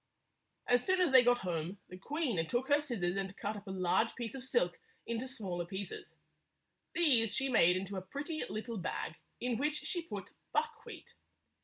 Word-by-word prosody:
As 245 Hz, 0 st, +4 dB
soon 375 Hz, 0 st, +2 dB
as 355 Hz, -5 st, +4 dB
they 260 Hz, -1 st, +9 dB
got 245 Hz, 0 st, +5 dB
home, 175 Hz, +2 st, -2 dB
the 185 Hz, -, -8 dB
queen 255 Hz, -, -1 dB
took 245 Hz, -, -1 dB
her 290 Hz, +1 st, +5 dB
scissors 200 Hz, -11 st, -1 dB
and 195 Hz, 0 st, -3 dB
cut 210 Hz, +2 st, -2 dB
up 205 Hz, 0 st, -9 dB
a -, -, -5 dB
large 190 Hz, +4 st, +1 dB
piece 235 Hz, -3 st, -4 dB
of 265 Hz, -2 st, -6 dB
silk 475 Hz, -, +1 dB, 0.3 s
into 235 Hz, +2 st, -2 dB
smaller 195 Hz, -9 st, -3 dB
pieces. 190 Hz, +3 st, -6 dB, 0.8 s
These 255 Hz, -11 st, +5 dB
she 270 Hz, 0 st, +1 dB
made 180 Hz, -7 st, +5 dB
into 195 Hz, +1 st, -4 dB
a -, -, -2 dB
pretty 290 Hz, -, -4 dB
little 220 Hz, 0 st, -4 dB
bag, 165 Hz, -2 st, -3 dB, 0.2 s
in 245 Hz, -2 st, 0 dB
which 300 Hz, +2 st, 0 dB
she 350 Hz, -, -1 dB
put 210 Hz, -12 st, -7 dB, 0.2 s
buckwheat. 455 Hz, +1 st, -3 dB
230 Hz, 180 wpm, -34 LUFS, 190-275 Hz, 0.8 s, they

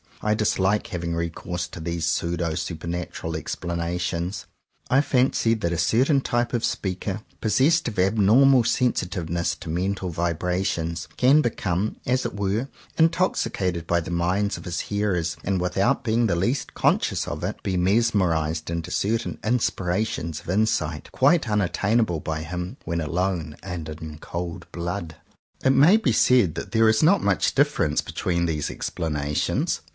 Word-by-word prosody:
I 105 Hz, -, +2 dB
dislike 105 Hz, 0 st, +1 dB
having 85 Hz, -5 st, -3 dB
re 85 Hz, 0 st, -1 dB
course 90 Hz, +1 st, -5 dB
to -, -, -9 dB
these 85 Hz, 0 st, -2 dB
pseudo 85 Hz, 0 st, -1 dB
supernatural 85 Hz, 0 st, -4 dB
ex 80 Hz, -, -3 dB
planations. 85 Hz, +1 st, -3 dB, 0.4 s
I 135 Hz, +2 st, +5 dB
fancy 125 Hz, -4 st, +2 dB
that 100 Hz, -6 st, -2 dB
a 85 Hz, -, -2 dB
certain 130 Hz, -, +3 dB
type 120 Hz, -1 st, -1 dB
of 120 Hz, -, 0 dB
speaker 95 Hz, +2 st, -3 dB, 0.2 s
possessed 135 Hz, +10 st, +3 dB
of 115 Hz, -, -5 dB
abnormal 110 Hz, +7 st, +5 dB
sensitiveness 90 Hz, -9 st, 0 dB
to -, -, -9 dB
mental 95 Hz, +3 st, -1 dB
vibrations, 85 Hz, 0 st, -1 dB
can 135 Hz, +5 st, +5 dB
become 105 Hz, -, -1 dB
as 130 Hz, +1 st, +1 dB
it -, -, -3 dB
were 100 Hz, +5 st, -1 dB, 0.3 s
intoxicated 100 Hz, -, +1 dB
by 85 Hz, -, +2 dB
the 85 Hz, +2 st, -6 dB
minds 90 Hz, +4 st, 0 dB
of -, -, -11 dB
his 90 Hz, -2 st, -2 dB
hearers, 95 Hz, -6 st, -1 dB
and, 95 Hz, -1 st, 0 dB
without 100 Hz, +10 st, +1 dB
being 115 Hz, 0 st, +2 dB
the 85 Hz, -, +1 dB
least 115 Hz, +11 st, -1 dB
con -, -, +3 dB
scious -, -, -2 dB
of -, -, -5 dB
it, -, -, -3 dB
be 95 Hz, -, -1 dB
mesmerized 90 Hz, -6 st, +1 dB
into 85 Hz, +1 st, -4 dB
certain 115 Hz, +3 st, -1 dB
inspirations 95 Hz, -7 st, -1 dB
of -, -, -12 dB
insight, 85 Hz, -6 st, 0 dB
quite 140 Hz, -1 st, +3 dB
unattainable 105 Hz, -1 st, +1 dB
by 80 Hz, 0 st, -3 dB
him 90 Hz, -, -5 dB
when 85 Hz, -1 st, -1 dB
alone 85 Hz, -1 st, -2 dB
and 90 Hz, -5 st, -5 dB
in 80 Hz, 0 st, -8 dB
cold 85 Hz, 0 st, -6 dB
blood. 85 Hz, -1 st, -4 dB, 0.5 s
It 130 Hz, -, +5 dB
may 155 Hz, +10 st, +6 dB
be 180 Hz, -, +1 dB
said 110 Hz, -7 st, +4 dB
that -, -, -6 dB
there 110 Hz, -1 st, +5 dB
is 110 Hz, -, +3 dB
not 185 Hz, +6 st, +4 dB
much -, -, +1 dB
difference 135 Hz, -, +2 dB
between 85 Hz, -1 st, -1 dB
these 80 Hz, -3 st, -1 dB
explanations. 75 Hz, -2 st, -2 dB
90 Hz, 155 wpm, -24 LUFS, 85-110 Hz, 0.5 s, may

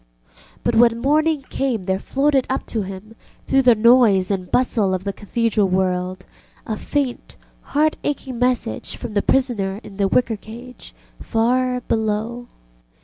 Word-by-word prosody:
But 240 Hz, -, +1 dB
when 230 Hz, 0 st, +4 dB
morning 300 Hz, +3 st, +1 dB
came 250 Hz, -7 st, -1 dB
there 190 Hz, +1 st, -1 dB
floated 275 Hz, +1 st, +1 dB
up 265 Hz, -, -2 dB
to 225 Hz, -, 0 dB
him, 195 Hz, +3 st, -8 dB, 0.3 s
through 270 Hz, -, +3 dB
the 245 Hz, -3 st, +5 dB
noise 215 Hz, -4 st, +5 dB
and 185 Hz, -2 st, -3 dB
bustle 220 Hz, -6 st, +1 dB
of 185 Hz, -, -5 dB
the 200 Hz, 0 st, -3 dB
Cathedral 215 Hz, 0 st, 0 dB
world, 185 Hz, 0 st, -1 dB, 0.4 s
a 220 Hz, -, -3 dB
faint 270 Hz, +2 st, -3 dB, 0.4 s
heart 310 Hz, +1 st, +3 dB
aching 265 Hz, -4 st, -3 dB
message 245 Hz, -, -1 dB
from 235 Hz, -3 st, -7 dB
the 205 Hz, -, +2 dB
prisoner 210 Hz, -8 st, 0 dB
in 195 Hz, -, -12 dB
the 200 Hz, -1 st, +2 dB
wicker 225 Hz, +2 st, +1 dB
cage 240 Hz, +4 st, -12 dB, 0.3 s
far 250 Hz, +2 st, +1 dB
below. 225 Hz, +2 st, -2 dB
230 Hz, 145 wpm, -21 LUFS, 200-255 Hz, 0.4 s, the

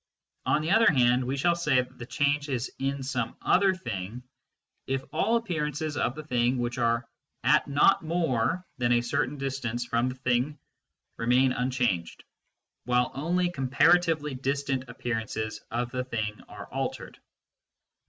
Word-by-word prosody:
On 150 Hz, +4 st, +2 dB
the 160 Hz, -, -1 dB
other 225 Hz, -4 st, +6 dB
hand 125 Hz, -2 st, +3 dB
we 130 Hz, +3 st, -2 dB
shall 170 Hz, +5 st, +3 dB
say 155 Hz, -5 st, +1 dB
that 125 Hz, +1 st, -4 dB
the 120 Hz, -, -7 dB
change 145 Hz, +1 st, 0 dB
is 125 Hz, -2 st, -2 dB
in 135 Hz, 0 st, -2 dB
some 125 Hz, -3 st, -2 dB
other 195 Hz, 0 st, +3 dB
thing 115 Hz, -, -5 dB, 0.6 s
if 135 Hz, 0 st, -1 dB
all 225 Hz, +3 st, +2 dB
appearances 155 Hz, -8 st, -2 dB
of 125 Hz, -, 0 dB
the 155 Hz, -, -7 dB
thing 125 Hz, -3 st, +1 dB
which 120 Hz, +1 st, -2 dB
are 115 Hz, 0 st, +1 dB, 0.4 s
at -, -, +4 dB
not 145 Hz, +7 st, +4 dB
more 165 Hz, 0 st, 0 dB
than 120 Hz, 0 st, +3 dB
a 120 Hz, -, +3 dB
certain 120 Hz, +3 st, -1 dB
distance 130 Hz, -3 st, -3 dB
from 120 Hz, +1 st, +1 dB
the 125 Hz, -, -6 dB
thing 130 Hz, +3 st, 0 dB, 0.6 s
remain 125 Hz, +3 st, +3 dB
unchanged, 125 Hz, -9 st, -1 dB, 0.6 s
while 125 Hz, 0 st, +2 dB
only 175 Hz, +5 st, 0 dB
comparatively 155 Hz, +2 st, +3 dB
distant 135 Hz, 0 st, -1 dB
appearances 110 Hz, -3 st, -3 dB
of 120 Hz, +1 st, -2 dB
the 125 Hz, 0 st, -2 dB
thing 110 Hz, -4 st, -3 dB
are -, -, -9 dB
altered. -, -, -4 dB
130 Hz, 150 wpm, -28 LUFS, 120-150 Hz, 0.6 s, other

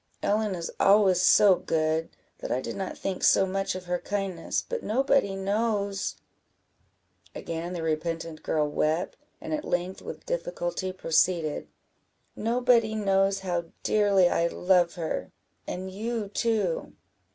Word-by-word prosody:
Ellen 210 Hz, -1 st, +1 dB
is 170 Hz, -1 st, -5 dB
always 195 Hz, -3 st, +5 dB
so 195 Hz, +1 st, +7 dB
good, 160 Hz, -2 st, 0 dB, 0.3 s
that -, -, -5 dB
I 125 Hz, -, +1 dB
did -, -, -5 dB
not 190 Hz, -2 st, -4 dB
think 190 Hz, -2 st, -4 dB
so 195 Hz, -, +5 dB
much 195 Hz, 0 st, -2 dB
of 185 Hz, 0 st, -7 dB
her 180 Hz, 0 st, -1 dB
kindness, 195 Hz, -4 st, -2 dB
but 485 Hz, -1 st, -3 dB
nobody 260 Hz, -3 st, +1 dB
knows 200 Hz, 0 st, -1 dB, 0.6 s
" -, -, -41 dB, 0.5 s
Again 170 Hz, +2 st, -5 dB
the 170 Hz, -2 st, -4 dB
repentant 160 Hz, 0 st, -3 dB
girl 150 Hz, -1 st, 0 dB
wept, 155 Hz, +4 st, 0 dB, 0.2 s
and -, -, -5 dB
at 305 Hz, -1 st, -2 dB
length 180 Hz, +2 st, -2 dB
with -, -, -8 dB
difficulty -, -, -3 dB
proceeded 165 Hz, -3 st, +1 dB, 0.7 s
"Nobody 230 Hz, -1 st, +2 dB
knows 195 Hz, -1 st, +2 dB
how 175 Hz, -3 st, -2 dB, 0.2 s
dearly 200 Hz, -3 st, +4 dB
I 170 Hz, -1 st, +2 dB
love 180 Hz, -1 st, +2 dB
her, 165 Hz, -3 st, -3 dB, 0.4 s
and 190 Hz, +1 st, -5 dB
you 220 Hz, +1 st, -3 dB
too." 230 Hz, -, -1 dB
190 Hz, 140 wpm, -27 LUFS, 175-215 Hz, 0.7 s, so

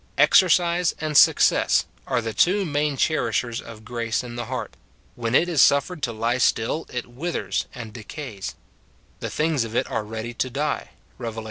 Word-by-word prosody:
Exercise 175 Hz, -1 st, +4 dB
and 155 Hz, -1 st, -3 dB
success -, -, +5 dB, 0.2 s
are 120 Hz, -, +1 dB
the 115 Hz, -1 st, -3 dB
two 190 Hz, -, +3 dB
main 145 Hz, -2 st, -1 dB
eherishers 120 Hz, -6 st, 0 dB
of 110 Hz, -1 st, -12 dB
grace 115 Hz, 0 st, -2 dB
in 120 Hz, -1 st, -8 dB
the 120 Hz, -1 st, -4 dB
heart; 120 Hz, -3 st, -5 dB, 0.4 s
when 115 Hz, 0 st, -2 dB
it 175 Hz, -, +4 dB
is 165 Hz, -5 st, +3 dB
suffered 145 Hz, +4 st, +3 dB
to 120 Hz, -, -1 dB
lie 115 Hz, +2 st, -1 dB
still, 125 Hz, +6 st, +1 dB
it 125 Hz, -, -3 dB
withers 145 Hz, +9 st, -3 dB
and 115 Hz, -3 st, -8 dB
decays: 115 Hz, -, -7 dB, 0.6 s
the -, -, -4 dB
things 155 Hz, -4 st, 0 dB
of 115 Hz, 0 st, -7 dB
it -, -, +2 dB
are -, -, -1 dB
ready 110 Hz, +2 st, -6 dB
to 130 Hz, +2 st, -2 dB
die, 145 Hz, +4 st, -2 dB, 0.3 s
Rev. 115 Hz, -2 st, -5 dB
iii. -, -, -2 dB
125 Hz, 175 wpm, -24 LUFS, 115-150 Hz, 0.6 s, success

